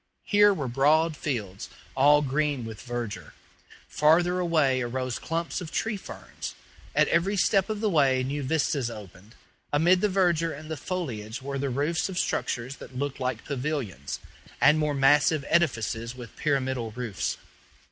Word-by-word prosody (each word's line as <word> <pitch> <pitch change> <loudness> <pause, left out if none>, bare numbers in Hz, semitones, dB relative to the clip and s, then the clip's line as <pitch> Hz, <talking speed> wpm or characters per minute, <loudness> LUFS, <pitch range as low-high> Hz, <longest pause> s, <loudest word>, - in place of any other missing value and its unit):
Here 205 0 +5
were 150 -9 -2
broad 150 +6 +3
fields, 105 -11 -4 0.3
all 145 +2 +5
green 145 -2 0
with 110 -2 -8
verdure; 120 -3 -5 0.5
farther 175 +4 +3
away 155 -7 +2
arose 130 0 -3
clumps 165 0 -3
of 165 -2 -7
tree 225 -1 -1
ferns; 195 - -8 0.4
at - - +4
every 195 +5 +2
step 195 +2 +3
of 215 -1 -3
the 215 - +2
way 135 -5 +3
new 140 +3 -2
vistas 140 -3 0
opened; 105 -1 -11 0.4
amid 175 +5 +4
the 210 - +2
verdure 175 -4 +2
and 155 +1 -9
the - - -1
foliage 130 - -5
were 140 0 -3
the 140 0 -1
roofs 145 +8 0
of 185 - -6
structures 125 -5 -2
that 130 - -10
looked 140 0 -3
like 130 0 -3
pavilions, 130 - -3 0.4
and 150 +2 +5
more 150 -1 0
massive 140 +2 +4
edifices 120 -7 0
with 120 -3 -10
pyramidal 130 -5 -1
roofs. 120 -5 -3
140 Hz, 155 wpm, -27 LUFS, 125-165 Hz, 0.5 s, Here